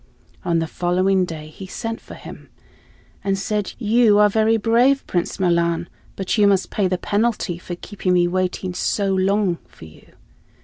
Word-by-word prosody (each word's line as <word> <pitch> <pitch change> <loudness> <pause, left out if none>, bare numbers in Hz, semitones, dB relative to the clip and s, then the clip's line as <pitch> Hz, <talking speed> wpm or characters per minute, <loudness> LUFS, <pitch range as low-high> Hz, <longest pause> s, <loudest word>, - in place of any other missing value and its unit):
On 170 -2 +1
the 165 - 0
following 185 +3 +1
day 155 -3 -8
he 190 +5 -10
sent 225 +4 -5
for - - -11
him - - -11 0.7
and 195 0 0
said; 210 -1 -2
"You 225 -2 +4
are 210 0 +6
very 220 +2 +3
brave, 240 +5 +3
Prince 175 +1 -2
Milan, 170 -2 +1 0.3
but 195 +3 -1
you 205 - +6
must 195 -2 +2
pay 200 -3 +1
the 185 0 0
penalty 210 -3 -1
for 175 0 -6
keeping 185 0 -2
me 175 -1 +4
waiting 185 0 -2
so 195 +2 0
long 190 -1 +1
for - - -14
you. 80 0 -17
190 Hz, 170 wpm, -21 LUFS, 175-210 Hz, 0.7 s, are